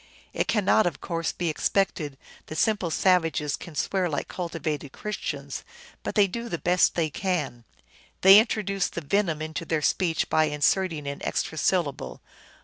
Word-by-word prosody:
It - - 0
cannot, 210 -1 +3
of 160 -4 -3
course, 165 -2 -2
be 175 - -3
expected 155 -3 0 0.3
that 155 - -7
simple 205 -1 +1
savages 165 -4 +2
can 170 - -11
swear 185 +4 0
like 145 - -3
cultivated 155 -5 -4
Christians, 210 0 -5 0.4
but - - -5
they 205 -2 +6
do 235 +5 -5
the 170 - -2
best 180 +2 +3
they 160 -3 0
can. 150 -11 -2 0.6
They 195 +2 +10
introduce 200 -4 0
the 170 - -6
venom 165 -1 0
into 160 +1 -4
their 160 -2 -1
speech 170 0 +1
by 155 - +3
inserting 150 +2 +1
an 140 0 -5
extra - - -2
syllable. 170 -7 -1
170 Hz, 155 wpm, -26 LUFS, 155-190 Hz, 0.6 s, They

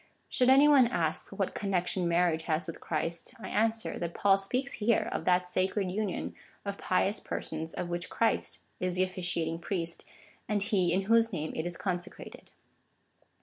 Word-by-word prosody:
Should 250 0 +3
any 275 +3 +7
one 275 -5 +7
K 240 - -7
ask, - - -1
what - - -2
connection 185 -3 0
marriage 170 -1 +2
has 160 +3 +1
with 165 - -7
Christ, 165 +1 -3
I - - -7
answer, 225 +1 0
that 170 -1 -4
Paul 195 -1 +5
speaks 250 +8 -2
here 230 +2 +3
of - - -3
that 180 0 +3
sacred 185 +1 0
union 200 -1 -2 0.3
of 200 0 -4
pious 195 +3 +1
persons, 160 +1 -4
of 180 - -3
which 175 0 -3
Christ 230 - 0 0.2
is 180 -1 -1
the 185 - +3
officiating 175 -3 -1
priest,^ 170 -2 -3 0.5
and 205 -2 +1
He 195 -5 +2
in 190 +3 +2
whose 230 +2 +4
name 155 -5 -3
it 160 - -2
is 175 -1 -3
consecrated. 180 -2 -5
185 Hz, 175 wpm, -30 LUFS, 175-210 Hz, 0.5 s, any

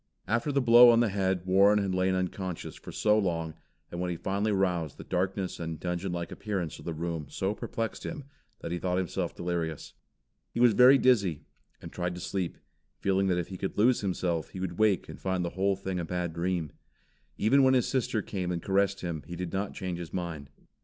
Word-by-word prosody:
After 115 +8 0
the 140 -1 +1
blow 120 0 +9
on 115 -1 +6
the 120 -2 +3
head 95 -2 0
Warren 100 +3 +5
had 100 -2 0
lain 95 0 +1
unconscious 95 -1 -3
for - - -10
so 105 0 +3
long, 85 -5 -1 0.4
and 85 - -4
when 90 - -1
he 85 - -3
finally 100 +5 -1
roused 90 -6 0
the - - -8
darkness 95 +1 -2
and 80 -2 -4
dungeon 90 +1 -3
like 85 -1 -4
appearance 95 -7 -4
of - - -12
the 85 - -3
room 80 -2 -3
so 95 +2 -1
perplexed 115 +1 -4
him, 150 -4 -5 0.4
that - - -5
he 85 - -2
thought 90 0 -1
himself 95 -3 -2
delirious. 85 -3 -3 0.6
He - - -1
was 120 -2 +6
very 125 +5 +8
dizzy, 100 - +2 0.4
and - - -8
tried 90 0 -3
to - - -7
sleep, 95 -2 -3 0.4
feeling 95 0 +1
that 90 -2 +2
if 90 - -3
he 95 - -6
could 95 - -4
lose 120 +4 +4
himself, 90 -4 -1
he 95 - -8
would 90 -1 -4
wake 105 -4 +3
and - - -10
find 95 -2 -1
the 85 - -3
whole 95 +1 +1
thing 95 -1 -4
a - - -2
bad 90 0 -3
dream. 85 -2 -2 0.7
Even 130 +7 +4
when 130 0 +5
his 125 - +2
sister 120 -5 0
came 90 -3 -3
and 85 -1 -3
caressed 100 0 +1
him, 85 -4 -3
he 85 - -6
did 90 -1 -5
not 95 +1 -2
change 90 -2 -4
his 85 -2 -7
mind. 85 -6 -5
95 Hz, 215 wpm, -29 LUFS, 85-100 Hz, 0.7 s, blow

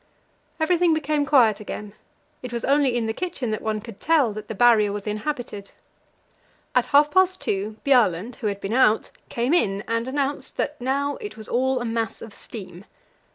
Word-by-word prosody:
Everything 335 +1 +3
became 300 -1 0
quiet 240 -7 +4
again; 210 -1 -7 0.5
it 250 - -7
was 235 -1 -3
only 275 -3 +3
in 235 - -1
the 220 - -1
kitchen 270 -7 -3
that 215 - -2
one 215 -1 -2
could 220 -1 -11
tell 295 -9 +2
that 215 0 -8
the 220 - -5
Barrier 220 -2 +5
was 205 0 -5
inhabited. 210 -2 -4 1.0
At 250 - +2
half 295 +1 +4
past 375 0 +3
two 205 +2 -2
Bjaaland, 235 -5 +2
who 225 - -3
had 200 -1 -2
been 200 +2 -4
out, 230 -3 +3 0.2
came 245 +5 0
in 200 - +1
and 230 +1 -1
announced 280 +1 -2
that - - -2
now 280 +3 -1
it 210 +1 -8
was 220 - -8
all 260 +1 +1
a 240 - -4
mass 225 -1 -2
of 225 - -10
steam. 195 -5 -9
235 Hz, 185 wpm, -24 LUFS, 215-280 Hz, 1.0 s, Barrier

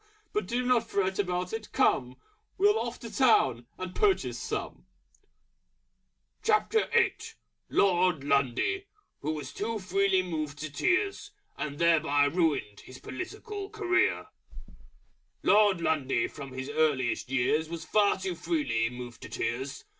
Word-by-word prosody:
But 420 - -1
do 245 +1 -1
not 240 -2 +2
fret 190 -1 0
about 180 -1 -1
it! 225 -1 -5
Come! 125 0 +2 0.4
We'll 415 +3 +4
off 240 0 -4
to 230 - -8
Town 130 - +3
And 185 0 -6
purchase 405 -3 +1
some!" - - -5 2.8
LORD 180 -5 +3
LUNDY, 140 - +1 0.3
Who 155 +2 -2
was 145 -3 -6
too 225 +2 -2
Freely 195 -1 +1
Moved 155 -5 -4
to 155 0 -6
Tears, 370 - 0 0.3
and 145 -1 -4
thereby 155 -4 +3
ruined 145 - 0
his 130 - -12
Political 395 - -7
Career. 380 -5 +1 1.2
Lord 205 -4 +4
Lundy 135 -7 +1
from 140 -3 -9
his 130 +1 -5
earliest 145 -6 +1
years 135 +5 +1
Was 170 -1 -6
far 205 -1 +3
too 190 -1 -3
freely 150 -10 0
moved 125 -1 -9
to - - -9
Tears. 130 +4 -3
170 Hz, 125 wpm, -29 LUFS, 140-220 Hz, 2.8 s, We'll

